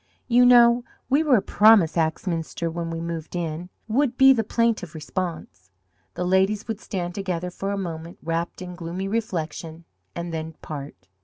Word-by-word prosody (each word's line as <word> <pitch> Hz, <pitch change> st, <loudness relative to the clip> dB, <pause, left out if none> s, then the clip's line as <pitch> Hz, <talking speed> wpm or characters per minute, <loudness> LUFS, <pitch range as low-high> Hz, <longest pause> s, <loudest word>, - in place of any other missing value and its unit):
"You 245 Hz, 0 st, +5 dB
know 240 Hz, 0 st, +6 dB, 0.3 s
we 285 Hz, +3 st, +4 dB
were 280 Hz, -8 st, +4 dB
promised 210 Hz, -6 st, +5 dB
Axminster 165 Hz, 0 st, -1 dB
when 170 Hz, 0 st, -4 dB
we 165 Hz, 0 st, -4 dB
moved 165 Hz, 0 st, -5 dB
in," 170 Hz, 0 st, -3 dB, 0.2 s
would 250 Hz, +2 st, +1 dB
be 270 Hz, 0 st, +8 dB
the 225 Hz, -3 st, 0 dB
plaintive 220 Hz, -7 st, 0 dB
response. 155 Hz, -, -5 dB, 0.5 s
The 180 Hz, -, -2 dB
ladies 190 Hz, +3 st, +2 dB
would 220 Hz, -2 st, -4 dB
stand 175 Hz, -3 st, -4 dB
together 180 Hz, -2 st, -3 dB
for 195 Hz, +2 st, -4 dB
a 200 Hz, -, -1 dB
moment 170 Hz, -3 st, -6 dB
wrapped 170 Hz, +3 st, -3 dB
in 180 Hz, 0 st, -7 dB
gloomy 175 Hz, +2 st, -5 dB
reflection, 170 Hz, -6 st, -4 dB, 0.3 s
and 170 Hz, 0 st, -5 dB
then 160 Hz, 0 st, -4 dB
part. 140 Hz, -11 st, -8 dB
180 Hz, 160 wpm, -24 LUFS, 165-215 Hz, 0.5 s, be